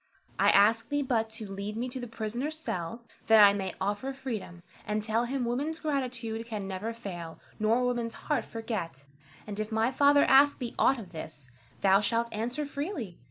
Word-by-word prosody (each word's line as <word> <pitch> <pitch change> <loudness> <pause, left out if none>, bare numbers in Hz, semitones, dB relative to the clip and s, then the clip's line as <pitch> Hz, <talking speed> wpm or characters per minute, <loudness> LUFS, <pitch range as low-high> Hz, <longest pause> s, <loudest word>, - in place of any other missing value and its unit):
I - - +5
ask 225 +3 +4
thee 290 0 0
but 225 -4 0
to 220 -3 -7
lead 200 +2 -5
me 245 +2 -2
to 260 +1 -6
the 245 - -5
prisoner's 235 +7 -3
cell, 210 - -4 0.2
that 220 0 +7
I 200 - +4
may 190 -2 -3
offer 205 +8 -2
freedom, 220 -10 -6 0.2
and 210 0 -2
tell 225 +2 +1
him 255 0 -2
woman's 280 +7 -1
gratitude 250 -7 -3
can 210 -4 -4
never 195 +4 -3
fail, 180 -8 -7 0.2
nor 225 +3 +2
woman's 240 -2 -1
heart 300 - -1
forget. 195 - -5 0.4
And 210 -1 -5
if 215 +1 -3
my 220 +3 +2
father 285 +2 +5
ask 280 +2 +6
thee 245 -3 -5
aught 270 - +4
of 200 -7 -9
this, 150 -5 -9 0.3
thou 195 0 +5
shalt 230 +2 0
answer 245 +7 -2
freely. 280 - -5
230 Hz, 185 wpm, -29 LUFS, 205-255 Hz, 0.4 s, that